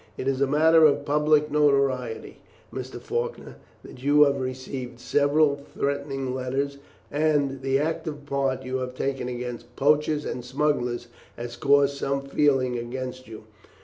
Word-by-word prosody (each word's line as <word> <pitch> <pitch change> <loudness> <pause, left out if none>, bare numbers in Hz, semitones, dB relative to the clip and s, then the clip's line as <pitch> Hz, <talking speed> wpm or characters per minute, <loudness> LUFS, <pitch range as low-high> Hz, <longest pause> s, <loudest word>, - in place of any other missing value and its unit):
It 130 - -4
is 135 0 0
a 140 - +4
matter 160 +3 +5
of 150 -2 +4
public 150 0 +2
notoriety, 140 -5 +1 0.3
Mr. - - -6
Faulkner, 475 +1 -4 0.3
that 125 - -12
you 145 +2 +5
have 140 -2 +1
received 130 -1 -5
several 145 +3 +2 0.2
threatening 140 -2 -2
letters, 135 +2 -2 0.3
and 145 -2 +2
that 135 -1 -9
the 135 0 +1
active 150 -1 -3
part 135 -2 -1
you 130 0 -2
have 125 -1 -5
taken 135 -1 -2
against 120 -1 -6
poachers 150 +1 +2
and 125 - -4
smugglers 125 -2 -1 0.3
has 120 0 -6
caused 140 +1 +3
some 140 0 -1
feeling 135 -3 +1
against 130 +1 -6
you. 110 -1 -10
140 Hz, 145 wpm, -25 LUFS, 130-145 Hz, 0.3 s, matter